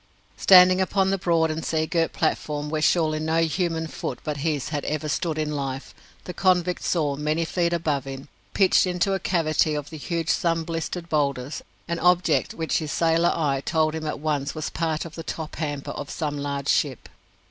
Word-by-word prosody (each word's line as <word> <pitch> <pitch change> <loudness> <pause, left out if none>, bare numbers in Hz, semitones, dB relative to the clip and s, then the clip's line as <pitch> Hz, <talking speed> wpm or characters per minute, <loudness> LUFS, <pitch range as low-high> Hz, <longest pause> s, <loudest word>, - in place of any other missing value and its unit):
Standing 185 0 +7
upon 190 0 +1
the 195 - 0
broad 165 -3 +2
and 160 +1 -4
sea 160 -1 0
girt 165 0 0
platform 150 -2 -1
where 155 -1 -1
surely 155 -1 +2
no 160 +1 +1
human 165 0 -1
foot 135 -5 -5
but 150 -1 -3
his 145 -2 -1
had 150 -2 -3
ever 155 0 -2
stood 160 +1 -1
in 150 -1 -1
life, 135 -1 -4 0.3
the 180 - -7
convict 180 -1 +2
saw, 150 -5 0
many 155 +3 -1
feet 170 0 0
above 155 -5 -1
him, 135 0 -7 0.3
pitched 190 -1 +4
into 180 +2 0
a 195 - 0
cavity 155 -4 +1
of 145 0 -5
the 160 - -7
huge 165 +1 -3
sun 165 -1 +1
blistered 165 +1 -4
boulders, 140 -3 -1 0.3
an 170 0 -2
object 180 0 +2
which 160 -1 0
his 155 -3 -4
sailor 165 +2 +3
eye 140 -4 0
told 155 -1 +1
him 160 -1 -4
at 150 - -3
once 150 -1 -2
was 155 - -4
part 160 -1 -1
of 165 - -9
the 165 - -6
top 160 -1 -6
hamper 145 -3 -3
of 145 - -6
some 150 -2 -3
large 140 -1 -3
ship. 140 -4 0
160 Hz, 195 wpm, -24 LUFS, 150-170 Hz, 0.3 s, Standing